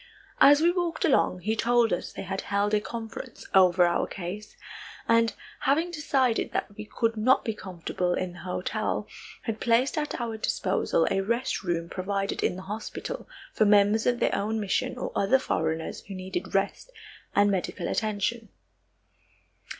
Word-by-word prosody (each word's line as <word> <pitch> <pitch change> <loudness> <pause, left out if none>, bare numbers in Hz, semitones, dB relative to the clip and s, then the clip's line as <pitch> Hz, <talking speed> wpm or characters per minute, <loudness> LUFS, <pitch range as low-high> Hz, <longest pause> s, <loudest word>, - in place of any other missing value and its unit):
As 290 +1 +7
we 340 +1 +5
walked 350 -2 -1
along 225 - +2
he 215 +4 0
told 235 -1 +3
us 175 - -3
they - - -7
had 190 +1 -3
held 205 +1 0
a 210 - +3
conference 225 0 -7
over 185 -1 +6
our 175 - +1
case, 195 +4 -7 0.5
and, 230 0 +3 0.2
having 320 +6 +1
decided 270 -7 +1
that 205 - -2
we 215 - -7
could 230 +1 -1
not 240 +5 +3
be 225 - -1
comfortable 180 -2 -3
in 185 -1 -3
the 175 - -12
hotel, 205 +3 -2 0.4
had 225 -2 -3
placed 245 +6 +2
at 300 -3 -3
our 230 -2 -3
disposal 185 -5 +1
a 195 - +2
rest 235 +6 -1
room 170 -3 -2
provided 195 +2 -2
in - - +1
the 185 - -8
hospital 220 - -6 0.2
for 215 - +3
members 205 +1 +4
of 245 -1 +2
their - - +2
own 220 +2 -1
mission 200 -3 -1
or - - -4
other 200 +7 +4
foreigners 160 -9 -2
who 195 - -7
needed 185 - -5
rest - - 0 0.5
and 205 0 +5
medical 190 -2 -2
attention. 215 +1 -1
215 Hz, 165 wpm, -27 LUFS, 190-235 Hz, 0.5 s, As